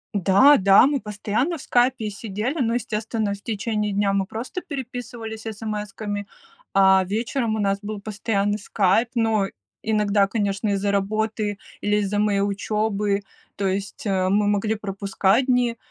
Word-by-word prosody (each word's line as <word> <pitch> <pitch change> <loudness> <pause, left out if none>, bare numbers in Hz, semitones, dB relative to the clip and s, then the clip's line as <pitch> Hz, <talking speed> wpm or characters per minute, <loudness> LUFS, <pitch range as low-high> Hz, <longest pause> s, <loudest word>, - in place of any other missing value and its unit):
Да-да, 200 +2 +6
мы 280 -1 +1
постоянно 220 - -2
в - - -10
Скайпе 245 -3 +1
сидели, 220 +8 -3
но 230 0 +1
естественно 220 -2 -2
в 200 - -9
течение 210 -1 -2
дня 200 0 +1
мы 195 -1 0
просто 250 +11 -5
переписывались 245 -5 -6
смсками, 210 -1 -5 0.5
а 190 -1 +5
вечером 225 +3 -1
у - - -3
нас 200 -1 +1
был 210 0 -5
постоянный 205 0 -1
Скайп. 205 +3 +2
Но 225 -3 +2 0.3
иногда 210 -2 +2
конечно 205 0 -1
из-за 200 0 0
работы 210 +1 -1 0.2
или 205 0 +1
из-за 205 0 0
моей 205 -1 +2
учебы, 205 0 0 0.3
то 195 -1 -1
есть, 200 +7 -3
э, 185 -2 +1
мы 205 +1 +2
могли 205 +2 +1
пропускать 200 +3 0
дни, 245 -2 +2
210 Hz, 145 wpm, -23 LUFS, 200-225 Hz, 0.5 s, Да-да